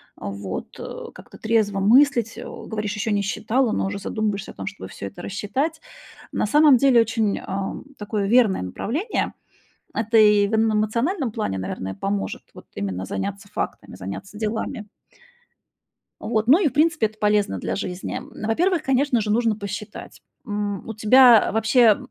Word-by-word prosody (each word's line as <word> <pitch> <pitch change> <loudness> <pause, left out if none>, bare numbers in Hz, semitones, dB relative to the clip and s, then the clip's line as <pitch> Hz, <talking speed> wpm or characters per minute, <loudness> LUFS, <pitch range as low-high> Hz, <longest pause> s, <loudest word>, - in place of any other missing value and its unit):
вот, 100 -1 -6
э, - - -7
как-то - - -14
трезво 220 -3 +1
мыслить. 235 +1 +4
Э, - - -6
говоришь, 210 -1 -5
ещё 215 +1 -2
не 205 -1 +1
считала, 230 +4 0
но - - 0
уже 200 - -4
задумываешься 210 -2 -3
о - - -14
том, 95 - -7
чтобы 95 - -7
всё 100 - -7
это 175 - -10
рассчитать. 270 - -2 0.5
На - - 0
самом 290 +3 +6
деле 250 -3 +5
очень, 225 -2 0
а, 195 0 -4 0.2
такое 205 -1 -2
верное 225 - +4
направление. 235 - -2 0.6
Это 225 0 +1
и 210 -1 +6
в 210 - -6
н 220 0 +3
эмоциональном 230 - 0
плане, 155 - -2
наверное, 95 0 -4
поможет 100 0 -3
вот - - -13
именно 95 -2 -3
заняться 100 0 -4
фактами, - - -5
заняться 145 - -7
делами. 220 -1 -3 1.3
Вот, 220 0 -1
ну 300 +7 +8
и - - +5
в - - -10
принципе 310 -5 +3
это 215 0 -11
полезно 210 -1 +1
для - - -3
жизни. 185 -2 -4 0.3
Во-первых, 340 +8 +1
конечно 265 -2 +2
же, 210 0 -2
нужно 225 0 +2
посчитать, 205 +1 -7 0.2
м, 205 -4 -3
у 225 - -4
тебя 230 +1 +6
вообще 220 0 +4
215 Hz, 160 wpm, -23 LUFS, 200-235 Hz, 1.3 s, ну